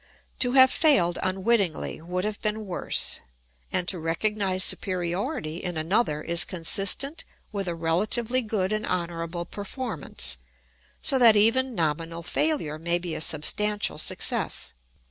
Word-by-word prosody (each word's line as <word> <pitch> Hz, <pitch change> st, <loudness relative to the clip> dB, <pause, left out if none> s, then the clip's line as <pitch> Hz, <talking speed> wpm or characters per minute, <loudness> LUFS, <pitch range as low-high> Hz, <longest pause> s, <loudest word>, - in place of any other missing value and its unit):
To 250 Hz, -1 st, +2 dB
have 260 Hz, -1 st, +7 dB
failed 185 Hz, -, +3 dB
unwittingly 190 Hz, -3 st, 0 dB
would 180 Hz, +3 st, -3 dB
have 210 Hz, -1 st, -4 dB
been 215 Hz, 0 st, -2 dB
worse; 185 Hz, -3 st, 0 dB, 0.5 s
and 180 Hz, -1 st, -1 dB
to 180 Hz, -, -1 dB
recognise 185 Hz, +3 st, 0 dB
superiority 180 Hz, -, -1 dB
in 175 Hz, -2 st, -4 dB
another 155 Hz, -2 st, 0 dB
is 170 Hz, 0 st, +3 dB
consistent 195 Hz, -, 0 dB, 0.3 s
with 200 Hz, -2 st, -3 dB
a 170 Hz, -, -2 dB
relatively 215 Hz, +10 st, 0 dB
good 210 Hz, -3 st, -1 dB
and 215 Hz, +1 st, -2 dB
honourable 170 Hz, 0 st, -3 dB
performance, 185 Hz, -, -5 dB, 0.7 s
so 265 Hz, -, +3 dB
that 230 Hz, -3 st, +8 dB
even 240 Hz, +4 st, +3 dB
nominal 165 Hz, 0 st, -2 dB
failure 175 Hz, -, -1 dB
may 170 Hz, +1 st, +1 dB
be 175 Hz, -1 st, -5 dB
a -, -, -4 dB
substantial 205 Hz, +7 st, +1 dB
success. -, -, -1 dB
185 Hz, 130 wpm, -26 LUFS, 170-215 Hz, 0.7 s, that